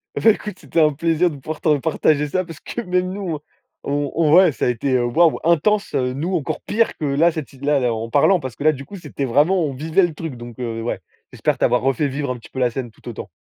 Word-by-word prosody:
Et - - -1
beh, 225 - +7
écoute, 210 -2 -5
c'était 165 - 0
un 150 -1 +4
plaisir 165 +3 +1
de 150 - -8
pouvoir 155 +3 -6
te 150 -2 +3
partager 150 0 +1
ça, 185 +5 -1
parce 165 -2 -11
que 240 - -5
même 180 -2 0
nous, 190 -4 -3 0.5
on 145 0 -1
on 160 -2 +3
ouais, 180 -3 +7
ça 120 - -2
a - - +2
été, 125 +3 -1
heu, 120 - +2
waouh, 160 +7 +3
intense, 185 +5 +2
heu, 125 -2 +1
nous 165 +8 -2
encore 150 -5 -2
pire 230 +2 0
que 155 - -3
là, 145 +5 +3
cette 155 -4 -5
ti 135 - -18
là 145 0 +2
là 120 -2 +1
en 115 +1 -4
parlant, 160 +8 +4
parce 130 -5 -6
que - - -6
là 155 - +7
du 140 - -8
coup, 200 - -9
c'était 150 -5 -6
vraiment 150 +9 +3
on 145 -3 -2
vivait 160 +7 +2
le 170 - -4
truc, 155 -3 -6
donc 120 -1 -10
heu, 115 -2 -3
ouais. 120 - -3 0.3
J'espère - - -1
t'avoir 125 - +2
refait 135 +2 +1
vivre 140 0 -3
un 125 - -4
petit - - -15
peu 130 - -6
la 125 -2 +2
scène 125 0 -4
tout - - -18
autant. - - -7
150 Hz, 270 wpm, -21 LUFS, 130-170 Hz, 0.5 s, beh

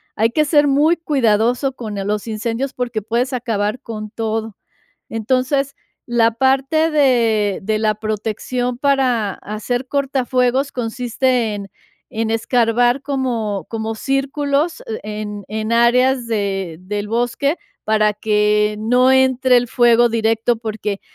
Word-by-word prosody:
Hay 225 +2 +2
que 305 +6 +1
ser 290 0 +4
muy 295 +5 +3
cuidadoso 250 -3 +1
con 215 -5 -6
eh, 195 - -3
los 210 +2 -2
incendios 230 +4 -3
porque 240 -3 -2
puedes 235 +5 -1
acabar 230 -1 -2
con 215 -3 -7
todo. 225 -1 -3 0.6
Entonces, 260 +5 0 0.3
la 235 -1 +3
parte 270 +6 +2
de 230 -9 +2
de 215 +2 0
la 215 -1 +1
protección 220 +4 -3
para 255 -7 +1
hacer 245 +4 -4
cortafuegos 265 -1 0
consiste 245 -1 -1
en 200 -1 -6 0.4
en 220 0 -2
escarbar 240 +2 +2
como 240 -8 -2
como 225 0 -3
círculos, 280 +5 -1 0.2
e 210 0 -5
en 210 -1 -6
en 220 +1 -3
áreas 245 +2 +3
de 195 -6 -2
del 205 +2 -4
bosque 245 +7 0 0.3
para 215 -1 +2
que 210 0 +1
no 250 +4 +3
entre 260 -1 +4
el 245 0 -2
fuego 240 0 +4
directo, 225 +1 +1
porque 215 -3 -4
235 Hz, 130 wpm, -19 LUFS, 215-260 Hz, 0.6 s, ser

